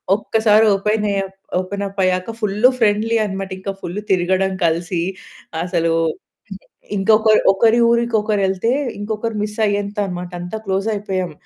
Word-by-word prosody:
ఒక్కసారి 215 +1 +3
ఓపెన్ 210 +2 0
ఏ - - -1
up, 195 0 -14 0.2
open 200 +2 -4
up 195 0 -9
అయ్యాక 185 +4 0
full 205 -1 -1 0.2
friendly 220 +1 +2
అన్నమాట. 195 -1 -4
ఇంకా 195 +1 -4
ఫుల్ 175 +4 -4
తిరగడం 190 +1 +2
కలిసి, 170 +1 0 0.6
అసలు 170 -2 0 1.0
ఇంకొక 215 +3 +3 0.3
ఒకరి 225 +4 +3
ఊరికి 235 0 +1
ఒకరెళ్తే, 205 0 0 0.3
ఇంకొకరు 215 +2 -3
మిస్ 210 0 -5
అయ్యేంత 205 +1 -2
అన్నమాట. 180 -1 -6
అంతా 180 +5 -5
క్లోజ్ 195 +1 -1
అయిపోయాం. 190 -4 -3
200 Hz, 135 wpm, -19 LUFS, 185-215 Hz, 1.0 s, ఒక్కసారి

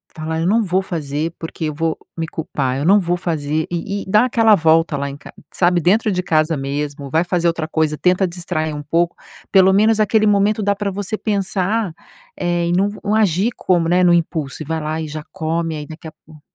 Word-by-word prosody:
fala 160 -1 -3
eu 165 - 0
não 225 +4 +3
vou 190 -1 +1
fazer, 155 -3 -3
porque 165 0 -5
eu 155 - -2
vou 160 +1 -1 0.2
me 165 -1 -2
culpar. 140 -5 -3
Eu 140 - -2
não 200 +4 +6
vou 175 -1 -1
fazer. 155 -3 -2
E 195 +4 -3
e - - -15
dá 215 +5 +5
aquela 225 -3 +4
volta 165 -2 +3
lá 140 0 -3
em 140 - -8
ca 140 - -13 0.2
sabe, 175 -1 +2
dentro 210 +6 +2
de 180 - 0
casa 155 0 +1
mesmo, 140 +1 -4
vai 160 +5 +2
fazer 175 -1 0
outra 165 -2 -1
coisa, 155 -1 0
tenta 180 +3 +2
distrair 170 -3 -3
um 150 - -6
pouco, 170 +3 0 0.4
pelo 190 -1 +6
menos 215 +2 +3
aquele 215 +1 +3
momento, 205 +1 +2
dá 200 0 +1
para 200 0 -2
você 205 +2 -4
pensar, 200 -1 -1 0.4
eh, 175 0 0
em 170 - 0
não 195 +3 +2
v 205 - -9
não 210 0 0
agir 210 +1 +2
como, 175 -3 +1
né, 180 +1 +3
no 175 -1 +5
impulso, 160 -4 -1
e - - -12
vai 160 +2 -2
lá 155 +1 -3
e 160 - -4
já 150 0 -6
come 165 -2 -2
aí 150 -1 -6
daqui 160 +1 -10
a 155 - -8
pouco. 155 -1 -16
170 Hz, 230 wpm, -19 LUFS, 155-195 Hz, 0.4 s, não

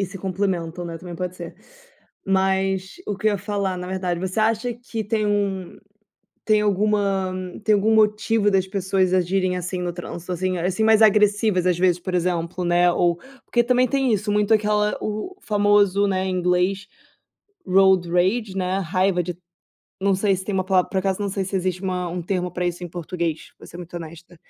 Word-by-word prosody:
e 195 - 0
se 195 +1 -9
complementam, 180 -3 -2
né, 165 -1 -6
também 180 -1 -8
pode 180 +1 -5
ser. 170 -1 -8 0.7
Mas 190 0 0
o 205 - -2
que - - -2
eu - - +1
ia 200 - -2
falar, 200 -1 -2
na 180 - -6
verdade, 185 -2 -2
você 190 +3 -2
acha 225 +2 +1
que 230 -2 -6
tem 215 0 0
um 200 -3 -1 0.7
tem 215 -1 +3
alguma, 200 -2 +1 0.3
tem 215 -1 +4
algum 215 +2 +2
motivo 215 0 +3
das 190 -1 +2
pessoas 190 -1 0
agirem 185 0 +1
assim 180 +1 -4
no 175 -1 -2
trânsito, 175 0 -7
assim 185 +1 -1
assim, 185 +5 -1
mais 220 0 +5
agressivas, 210 -3 +3
às 175 -1 +2
vezes, 180 -1 +3
por 185 +1 -5
exemplo, 175 0 -1
né 175 0 +3
ou 170 -1 +2 0.3
porque 240 - +2
também 250 +1 +3
tem 270 -2 +1
isso 210 0 0
muito 210 +1 +2
aquela 210 0 +1
o 215 - -4
famoso, 205 -1 +3
né, 190 -1 0
em 185 -1 -1
inglês 180 +2 0 0.8
"road 190 -2 +4
rage", 190 +3 +1
né, 185 0 -1
raiva 185 +1 +1
de 175 0 -5 0.6
não 195 0 +2
sei 195 0 +2
se 190 - -7
tem 205 - -3
uma 185 - 0
palavra, 185 -1 +1
por 190 - 0
acaso, 190 +1 -1
não 205 - -1
sei 195 0 -2
se 195 +1 -6
existe 185 0 -2
uma 180 -2 -2
um 175 0 -4
termo 180 0 -2
pra 180 0 -2
isso 175 +1 -3
em - - -6
português, 170 -1 -4
vou - - -13
ser - - -11
muito 175 0 -10
honesta. 170 +1 -10
190 Hz, 195 wpm, -22 LUFS, 180-205 Hz, 0.8 s, mais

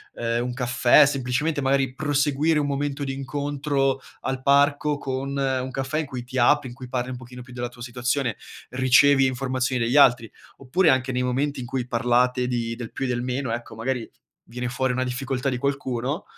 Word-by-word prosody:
ehm, 115 0 -1
un 125 - -3
caffè, 125 +2 +5
semplicemente 140 +3 -1
magari 135 -1 +1
proseguire 145 +2 +1
un 145 - 0
momento 140 0 -2
di 135 - -2
incontro 140 0 -1 0.2
al 130 -1 -3
parco 145 +2 +3
con 135 0 -4
un 130 -1 0
caffè 135 +4 -2
in 160 - -1
cui 130 -3 -6
ti 125 +2 -7
apri, 130 +2 +3
in 120 - -11
cui 130 0 -9
parli 125 0 -2
un 130 - -5
pochino 125 0 -11
più 125 +1 -14
della 120 0 -3
tua 120 0 -15
situazione, 125 0 -1 0.3
ricevi 130 +2 +5
informazioni 130 -1 -1
dagli 120 +5 +1
altri. 120 -5 +5 0.3
Oppure 160 +7 +2
anche 130 -1 +2
nei 125 0 -1
momenti 135 +3 -1
in 125 - -5
cui 125 0 -3
parlate 125 +1 +1
di 120 -2 -2
del 120 -2 -7
più - - -4
e - - -1
del 120 -1 -1
meno 130 0 -2
ecco, 120 -1 -5
magari 120 +1 -3 0.4
viene 125 +1 -5
fuori 130 +1 0
una 130 +1 0
difficoltà 130 +1 -2
di 125 - -2
qualcuno 140 - -2
130 Hz, 195 wpm, -24 LUFS, 125-140 Hz, 0.4 s, caffè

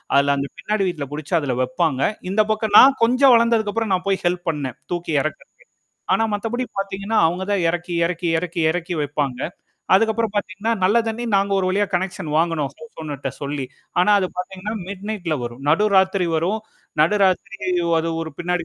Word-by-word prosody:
அதுல 140 0 +4
அந்தப் 140 0 -4
பின்னாடி 210 -1 -1
வீட்டுல 150 -5 -5
புடிச்சு 155 +4 -6
அதுல 135 -5 -2
வப்பாங்க. 155 -1 0 0.3
இந்தப் 215 +1 +2
பக்கம் 215 -1 0
நான் 270 -1 +7
கொஞ்சம் 255 +2 +5
வளந்ததுக்கப்புறம் 225 -2 +1
நான் 185 +1 -1
போய் 195 - 0
ஹெல்ப் 175 -1 -2
பண்ணேன். 135 -5 -5 0.2
தூக்கி 170 -2 -3
எறக்கறக்கு. 155 - -7 0.5
ஆனா 225 - +2
மத்தபடி 240 +4 -2
பாத்தீங்கன்னா, 195 +2 -2
அவுங்க 180 +3 -3
தான் 190 -4 +1
எறக்கி, 175 0 -3
எறக்கி, 175 0 -2
எறக்கி, 175 -1 -3
எறக்கி 175 0 -3
வைப்பாங்க. 140 -3 -2 0.5
அதுக்கப்புறம் 220 +1 +2
பாத்தீங்கன்னா, 205 +3 -1
நல்ல 205 +5 +3
தண்ணீ 235 +2 -3
நாங்க 200 0 +1
ஒரு 185 - 0
வழியா 200 +2 +1
கனெக்சன் 185 -3 -2
வாங்குனோம். 165 -4 0
ஹவுஸ் 155 - -14
ஓனர்ட்ட 145 -3 -4
சொல்லி. 140 -1 -3 0.4
ஆனா 210 - +3
அது 185 - 0
பாத்தீங்கன்னா, 190 +4 -5
மிட் 200 0 -7
நைட்ல 175 -7 -2
வரும். 120 +3 -7
நடுராத்திரி 190 0 +3
வரும். 190 +7 0 0.4
நடுராத்திரி 195 +1 +1 0.4
அது 165 +1 -2
ஒரு 160 -2 -7
பின்னாடி 175 0 -1
185 Hz, 165 wpm, -21 LUFS, 160-210 Hz, 0.5 s, நான்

